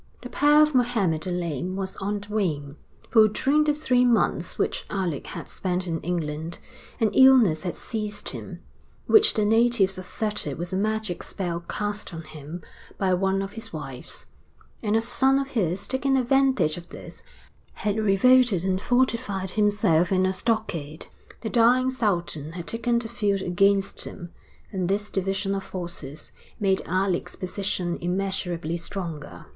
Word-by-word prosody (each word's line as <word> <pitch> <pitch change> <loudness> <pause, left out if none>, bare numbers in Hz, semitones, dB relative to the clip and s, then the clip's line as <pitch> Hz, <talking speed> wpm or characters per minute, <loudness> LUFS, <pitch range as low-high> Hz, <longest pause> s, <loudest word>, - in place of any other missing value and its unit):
The - - -7
power 295 +1 +5
of 305 0 +1
Mohammed 225 -11 +2
the 180 - -3
Lame 175 0 -2
was 190 -1 -4
on 205 +1 -2
the 205 +1 -10
wane; 150 -9 -1 0.4
for, 220 -2 +7
during 285 +8 +2
the 300 - +3
three 255 -5 +2
months 240 -2 +1
which - - -1
Alec 180 -8 -2
had - - -7
spent 185 -1 -2
in 165 -2 -3
England, 165 -1 -3 0.4
an 220 -3 +2
illness 255 -11 +6
had 180 -2 -3
seized 210 -2 -4
him, - - -7 0.4
which 435 -1 +5
the 215 - +2
natives 220 -4 +3
asserted 210 -5 -4
was 175 +2 -5
a - - +1
magic 215 -2 -1
spell 175 -4 -3
cast 205 -3 -4
on 165 - -6
him 155 +2 -9 0.3
by 190 -2 +1
one 195 +1 +1
of 195 - -6
his 225 +1 -7
wives; 135 -5 -6 0.6
and 210 0 0
a 225 - +3
son 265 +3 +3
of 275 0 -2
his, 190 -4 -1
taking 270 0 +1
advantage 260 - +2
of 175 0 -10
this, - - -10 0.5
had 210 0 -1
revolted 215 -1 +4
and 190 0 0
fortified 230 -7 0
himself 205 -5 +2
in 185 -1 +3
a 190 - +1
stockade. 185 -8 -2 0.4
The 220 - -4
dying 250 +2 +4
Sultan 175 - -2
had 175 -1 -6
taken 235 +1 0
the 235 -1 -2
field 205 -4 0
against 195 +2 +1
him, 175 -2 -9 0.4
and 185 -2 -2
this 205 +1 0
division 195 +1 -1
of 195 0 -2
forces 170 -6 -7 0.3
made 195 -2 +2
Alec's 185 0 -1
position 185 -2 -2
immeasurably 175 -2 -1
stronger. 165 -3 -6
195 Hz, 160 wpm, -25 LUFS, 175-225 Hz, 0.6 s, for